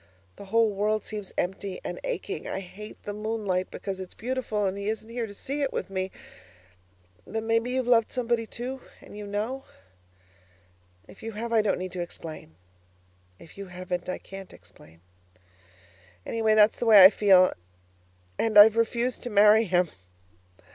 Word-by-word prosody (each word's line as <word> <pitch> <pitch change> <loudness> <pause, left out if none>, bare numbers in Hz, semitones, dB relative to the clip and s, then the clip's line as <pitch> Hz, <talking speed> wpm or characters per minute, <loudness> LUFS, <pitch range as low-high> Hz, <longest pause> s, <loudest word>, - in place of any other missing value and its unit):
The 200 - -11
whole 220 +1 +2
world 210 +2 0
seems 210 -3 -6
empty 190 +1 -3
and - - -5
aching. - - -4
I 190 - -3
hate 205 +3 -11
the 205 - -5
moonlight 210 -4 -2
because 195 -2 -6
it's 185 -1 -8
beautiful 235 -4 -2
and 190 0 -1
he 200 +1 -3
isn't 220 0 -4
here 235 -1 -3
to 200 - -10
see 280 +7 -4
it 275 - 0
with - - -4
me. 190 0 -2 1.2
But 220 0 -3
maybe 230 +1 +1
you've 255 0 -1
loved 235 -2 +3
somebody, 235 -2 -1
too, 255 +4 -6 0.2
and - - -14
you 210 0 -7
know? 220 +7 -3 1.4
If - - -15
you 225 0 -6
have, 230 +2 -4
I 225 - +5
don't 210 -2 0
need 185 0 -5
to 180 - -4
explain; 160 - -8 0.8
if 165 - -15
you 200 - -7
haven't, 180 0 -5
I 185 - -2
can't 195 -1 -11
explain. 80 +1 -18 1.2
Anyway, 220 -1 +1
that's 215 0 +5
the 240 - -1
way 210 -4 +9
I 190 - +10
feel 190 -4 +5 0.9
and 220 -2 +2
I've 215 +2 +9
refused 235 +2 0
to 245 - -5
marry 210 +1 +6
him. 180 -2 +2
210 Hz, 170 wpm, -27 LUFS, 190-230 Hz, 1.4 s, I